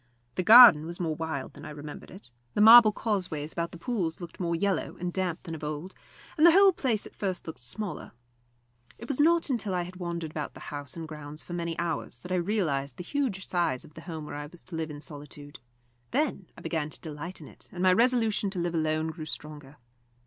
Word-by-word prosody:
The - - -1
garden 215 -6 +9
was 170 +1 -6
more 165 -3 -1
wild 160 -4 -4
than 145 - -12
I 155 - -7
remembered 150 0 -9
it; 185 - -11 0.2
the - - 0
marble 225 +1 +10
causeways 180 -9 -2
about 170 0 -2
the - - -9
pools 180 -7 -2
looked 175 -2 -9
more 170 -2 0
yellow 195 +3 -1
and 175 0 -3
damp 185 -3 -2
than 165 - -7
of 155 - -7
old, 155 +5 -5 0.5
and - - +4
the 340 -1 +9
whole 390 +1 +7
place 235 -9 0
at - - -11
first 190 -3 -3
looked 160 - -8
smaller. 185 - -5 0.9
It 235 - -10
was 280 0 -3
not 330 0 +3
until 215 -6 -1
I 175 - 0
had 180 +1 -9
wandered 170 -3 -4
about 150 -2 -5
the - - -10
house 145 +1 -6
and 165 -1 -6
grounds 150 -1 -9
for 175 - -9
many 170 -1 -3
hours 170 -1 -3
that 180 - -9
I - - +2
realised 165 - -1
the 180 - -6
huge 235 -5 -2
size 170 -8 0
of 150 - -17
the - - -10
home 160 -4 -7
where - - -8
I 145 0 -5
was 170 +3 -15
to 185 - -9
live 160 -1 -3
in 145 -1 -8
solitude. 145 -1 -8 0.5
Then 265 - -1
I - - -11
began 160 -2 -2
to - - -8
delight 160 +4 -7
in - - -11
it, - - -12
and 180 0 -4
my 185 -1 +6
resolution 225 -2 +2
to 190 -2 -5
live 175 0 -1
alone 155 0 0
grew 160 -1 -8
stronger. 150 -1 -8
170 Hz, 230 wpm, -28 LUFS, 155-200 Hz, 0.9 s, marble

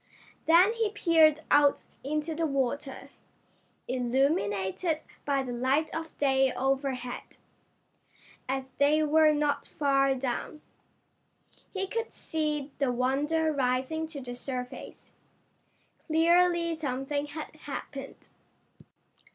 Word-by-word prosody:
Then 355 +6 +6
he 455 -2 0
peered 320 -6 +4
out 290 -1 +4 0.2
into 305 +3 -2
the 325 +1 0
water, 275 0 -2 0.8
illuminated 255 - 0 0.2
by 275 -2 +1
the 250 - -5
light 265 +6 +1
of 320 0 -6
day 270 -2 +3
overhead, 265 -2 -2 1.1
as 265 0 -3
they 300 +2 +4
were 310 +1 +5
not 295 -1 0
far 275 -2 +2
down. 260 +4 -4 1.1
He 385 -1 -2
could 455 +4 -3
see 300 -3 -2
the 275 -3 +2
Wonder 290 +6 +1
rising 265 +4 0
to 305 -3 -7
the 245 -1 -6
surface. 250 0 -6 1.0
Clearly 340 +1 +3
something 285 -1 -3
had 305 +1 -7
happened. 275 -2 -8
285 Hz, 100 wpm, -29 LUFS, 265-320 Hz, 1.1 s, Then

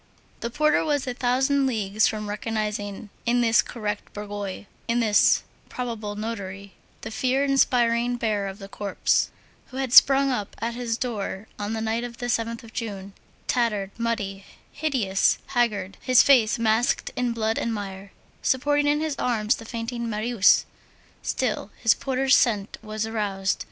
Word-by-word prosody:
The 235 - -3
porter 305 +4 +2
was 290 -3 0
a 250 - -3
thousand 265 +3 +2
leagues 215 -3 +1
from 215 -1 -3
recognizing 210 -1 -3 0.2
in 245 +1 +3
this 230 -1 +5
correct 210 -3 -5
bourgeois, 205 -2 -5 0.2
in 235 +1 +1
this 215 -3 +4 0.3
probable 225 -4 -4
notary, 200 -3 -6 0.3
the 220 - -6
fear 255 +4 +1
inspiring 245 -3 +2
bearer 215 -4 -1
of 195 0 -6
the 195 -2 -9
corpse, 200 -1 0 0.4
who 260 - -9
had 265 -2 -2
sprung 275 0 +7
up 210 -6 -3
at 230 +2 -2
his 235 -1 -2
door 215 -4 -4
on 205 +1 -3
the 220 - -2
night 225 +1 -1
of 240 -1 -7
the 245 - -5
7th 230 -1 -1
of 225 -1 -14
June, 200 -3 -5 0.3
tattered, 210 -5 0
muddy, 205 -4 -2 0.3
hideous, 255 -11 +1
haggard, 210 -6 0
his 255 -2 +6
face 240 -6 +5
masked 225 +1 +1
in 245 -1 0
blood 225 -1 -1
and 230 - -1
mire, 195 -2 -6 0.3
supporting 290 +3 +2
in 295 +1 +2
his 315 -2 -1
arms 225 -1 +1
the 225 - -10
fainting 235 0 -4
Marius; 215 -1 +3 0.6
still, 225 -5 -2
his 230 -1 +5
porter's 270 0 +2
scent 210 -4 +1
was 215 0 -3
aroused. 205 -3 -1
230 Hz, 155 wpm, -25 LUFS, 205-245 Hz, 0.6 s, sprung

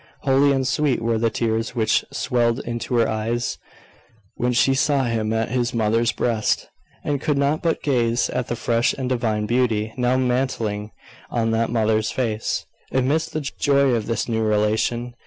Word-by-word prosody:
Holy 140 +1 +3
and 135 -1 +1
sweet 135 +1 +1
were 115 -1 0
the 115 0 +2
tears 115 +1 -1
which 110 -2 +2
swelled 120 0 0
into 120 +1 -3
her 115 -1 +3
eyes 115 +2 -2 0.7
when 125 +1 -1
she 125 +2 +3
saw 140 0 +2
him 115 -3 -1
at 115 0 0
his 125 -1 -1
mother's 115 +1 +2
breast, 115 -3 0 0.4
and 145 -2 -1
could 150 -2 0
not 140 +2 +1
but 165 -2 -1
gaze 120 -4 +1
at 125 -1 -2
the 120 - -2
fresh 115 0 +1
and 130 -2 -4
divine 110 -4 0
beauty 110 -2 0
now 125 0 +2
mantling 125 -5 -1 0.4
on 115 -1 0
that 115 0 +1
mother's 110 -2 +1
face, 115 -4 -2 0.3
amidst 140 +5 0
the 155 - -1
joy 140 -1 +2
of 115 -3 -1
this 115 -2 -1
new 110 -2 0
relation. 110 +3 0
120 Hz, 170 wpm, -22 LUFS, 110-130 Hz, 0.7 s, Holy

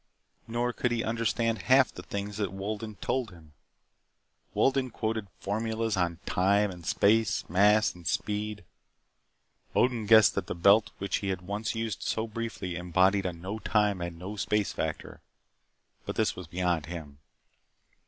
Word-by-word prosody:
Nor 120 +1 -1
could 125 - 0
he 120 -1 -1
understand 115 0 0
half 130 0 +6
the - - -8
things 100 +4 -5
that 100 -4 -1
Wolden 105 +2 -5
told 120 +4 -2
him. 80 -5 -16 1.0
Wolden 135 -1 +2
quoted 110 -2 -3
formulas 110 +1 -1
on 85 -2 0
time 100 +2 +2
and 90 -2 -10
space, 105 0 +2
mass 105 +4 +4
and 85 -2 -10
speed. 105 -1 -2 1.1
Odin 120 -4 +2
guessed 110 -2 +7
that - - -3
the - - -3
belt 100 +5 +5
which 100 - -1
he 100 - -4
had 95 -2 -2
once 105 +5 -3
used 110 -3 -3
so 110 - -1
briefly 115 -5 -5
embodied 95 +3 +2
a - - -1
No 95 +6 -6
Time 105 -4 +1
and 85 -1 -5
No 95 +5 -6
Space 105 +1 0
factor. - - -4 0.9
But - - -3
this - - +1
was 90 -3 -8
beyond 90 -3 -1
him. 80 -5 -8
105 Hz, 155 wpm, -29 LUFS, 90-110 Hz, 1.1 s, guessed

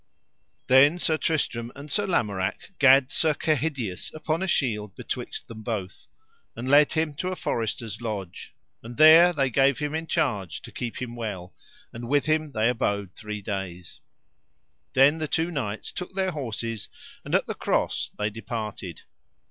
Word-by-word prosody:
Then 140 +6 +6
Sir 160 -2 +2
Tristram 125 -7 -1
and 145 +1 -10
Sir 205 +5 +2
Lamorak 100 - -1
gat 135 -1 +6
Sir 155 -2 +1
Kehydius 140 - -1
upon 155 +2 -2
a 190 - -1
shield 105 - 0
betwixt - - -5
them 110 -1 -9
both, 105 -4 -5 0.5
and 120 - -5
led 145 +2 +5
him 160 -2 0
to 180 - -2
a 185 - -2
forester's 110 - -3
lodge, 100 -6 -6 0.3
and 120 +1 -10
there 160 +3 +9
they 135 -6 0
gave 135 +1 +3
him 150 0 -3
in 160 +1 -3
charge 100 - -1
to - - -10
keep 120 -2 -5
him 120 -1 -6
well, 100 -6 -5 0.4
and 120 0 -7
with 145 0 +2
him 155 -1 +1
they 110 0 +2
abode 100 -5 -1
three 105 -2 -7
days. 95 -4 -6 0.9
Then 140 +4 +5
the 155 - -2
two 165 +3 0
knights 110 -9 -4
took 180 +1 -7
their 190 -1 0
horses 115 - -4 0.3
and - - -1
at - - +2
the - - -3
cross - - -1
they 105 +1 -1
departed. 105 -5 -6
125 Hz, 165 wpm, -26 LUFS, 105-155 Hz, 0.9 s, there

